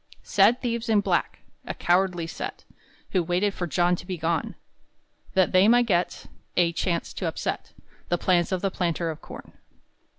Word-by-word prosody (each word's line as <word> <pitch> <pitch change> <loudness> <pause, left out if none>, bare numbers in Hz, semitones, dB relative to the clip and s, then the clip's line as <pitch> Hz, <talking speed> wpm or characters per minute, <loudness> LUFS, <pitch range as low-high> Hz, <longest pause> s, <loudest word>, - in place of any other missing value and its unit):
Sad 210 +6 +3
thieves 235 -1 -2
in 215 -2 +4
black, - - -1 0.3
A - - -4
cowardly 175 -1 +1
set, 165 - -6 0.5
Who 185 - +2
waited 180 +4 0
for 175 - -3
John 175 +2 +2
to - - -10
be 185 -2 -3
gone, 165 0 -1 0.8
That 185 -1 +3
they 185 +2 +5
might 240 +1 +5
get 180 -5 0 0.3
A 170 -1 +3
chance 170 0 -2
to - - -3
upset - - -4 0.4
The 175 - +2
plans 175 0 +2
of 185 0 -1
the 195 - +1
planter 170 -2 -1
of 155 - -10
corn. - - -11
180 Hz, 170 wpm, -25 LUFS, 175-195 Hz, 0.8 s, they